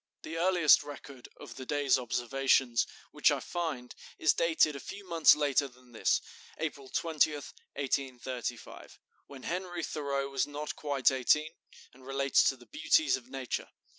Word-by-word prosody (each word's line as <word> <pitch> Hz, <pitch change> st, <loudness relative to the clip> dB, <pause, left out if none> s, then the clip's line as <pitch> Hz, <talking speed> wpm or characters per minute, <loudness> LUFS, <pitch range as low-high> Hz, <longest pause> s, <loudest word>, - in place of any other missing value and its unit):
The 160 Hz, -, -6 dB
earliest 175 Hz, -2 st, +5 dB
record 140 Hz, -3 st, -10 dB
of -, -, -11 dB
the 130 Hz, -, -7 dB
day's 145 Hz, -3 st, +2 dB
observations 125 Hz, 0 st, +1 dB, 0.2 s
which -, -, +3 dB
I -, -, +1 dB
find 155 Hz, -8 st, -4 dB, 0.2 s
is 155 Hz, -, +3 dB
dated 160 Hz, -3 st, +2 dB
a -, -, -6 dB
few 200 Hz, +6 st, -9 dB
months 165 Hz, -2 st, +6 dB
later 145 Hz, -1 st, +1 dB
than 125 Hz, -1 st, -20 dB
this 115 Hz, -, +1 dB, 0.4 s
(April 140 Hz, -4 st, -5 dB
20, 160 Hz, 0 st, +1 dB
1835), 130 Hz, -4 st, -5 dB, 0.3 s
when 135 Hz, -2 st, -11 dB
Henry 175 Hz, -1 st, -4 dB
Thoreau 140 Hz, -3 st, -2 dB
was 135 Hz, -1 st, -1 dB
not 145 Hz, +1 st, -5 dB
quite 140 Hz, -3 st, +1 dB
eighteen, 150 Hz, +5 st, +2 dB, 0.4 s
and 130 Hz, +1 st, -18 dB
relates 135 Hz, 0 st, +2 dB
to 135 Hz, -, -4 dB
the 120 Hz, -, -17 dB
beauties 310 Hz, +1 st, +2 dB
of 130 Hz, -1 st, -10 dB
nature. 130 Hz, -2 st, -4 dB
140 Hz, 150 wpm, -31 LUFS, 130-155 Hz, 0.4 s, months